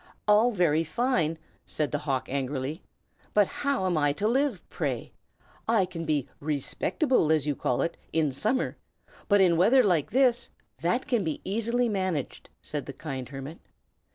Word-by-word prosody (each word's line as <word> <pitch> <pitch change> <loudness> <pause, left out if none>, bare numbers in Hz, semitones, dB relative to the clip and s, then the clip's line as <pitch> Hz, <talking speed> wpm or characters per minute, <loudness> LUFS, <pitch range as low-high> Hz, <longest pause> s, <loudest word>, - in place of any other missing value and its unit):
"All 210 +3 +5
very 170 -7 +2
fine!" 165 - 0 0.3
said 150 -2 -2
the 150 - -1
hawk, 135 -4 -1
angrily. 135 +3 -3 0.5
"But 205 -1 +6
how 280 -2 -1
am 175 -4 +1
I 145 -1 +2
to 205 +8 -1
live, 255 -4 0
pray? - - -3 0.5
I 220 -4 +3
can 170 -2 -6
be 150 -4 0
'respectable,' 155 - 0
as 155 -3 +2
you 145 -1 0
call 125 - 0
it, 170 - -2 0.2
in 155 -3 +1
summer; 220 - 0 0.5
but 205 -1 +5
in 175 -3 +4
weather 240 +9 +5
like 175 -8 +2
this 245 -1 +2 0.2
" - - -35
"That 180 +10 +1
can 240 -7 +1
be 160 -3 -2
easily 230 +4 0
managed," 185 - -2
said 145 -2 -4
the 140 - -6
kind 135 -5 -6
hermit. 140 +4 -8
170 Hz, 165 wpm, -27 LUFS, 150-225 Hz, 0.5 s, But